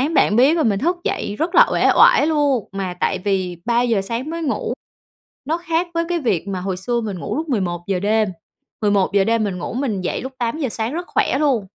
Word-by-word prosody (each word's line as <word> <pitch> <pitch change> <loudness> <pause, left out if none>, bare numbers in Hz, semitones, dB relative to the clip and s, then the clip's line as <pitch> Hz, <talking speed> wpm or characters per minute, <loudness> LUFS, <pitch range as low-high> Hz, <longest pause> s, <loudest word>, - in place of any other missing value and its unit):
bạn 210 - +4
biết 280 +8 +5
là 315 - +2
mình 205 -4 +1
thức 350 +6 0
dậy 205 - -2
rất 335 +3 -1
là - - +8
uể - - +3
oải 470 -10 +6
luôn, 290 -8 +1
mà 190 -2 -4
tại 190 - 0
vì 185 -3 -1
03:00 235 -3 +2
sáng 235 +8 -4
mới 335 0 -4
ngủ, 275 - -2 0.7
nó 315 +5 0
khác 340 0 -1
với 335 0 +1
cái 350 -1 0
việc 200 - -1
mà 185 -2 -3
hồi 185 -1 -3
xưa 235 +6 -1
mình 205 -5 -4
ngủ - - -4
lúc 315 +1 -3
11:00 185 -5 -1
đêm, 215 +1 +2 0.5
11:00 200 -2 +2
đêm 230 -1 +1
mình 195 -3 -3
ngủ - - -5
mình 240 -7 -1
dậy 180 - -2
lúc 265 +1 -6
08:00 255 +4 -1
sáng 225 +3 -3
rất 350 +2 -4
khỏe 265 - 0
luôn. 260 -10 +1
230 Hz, 220 wpm, -20 LUFS, 195-300 Hz, 0.7 s, là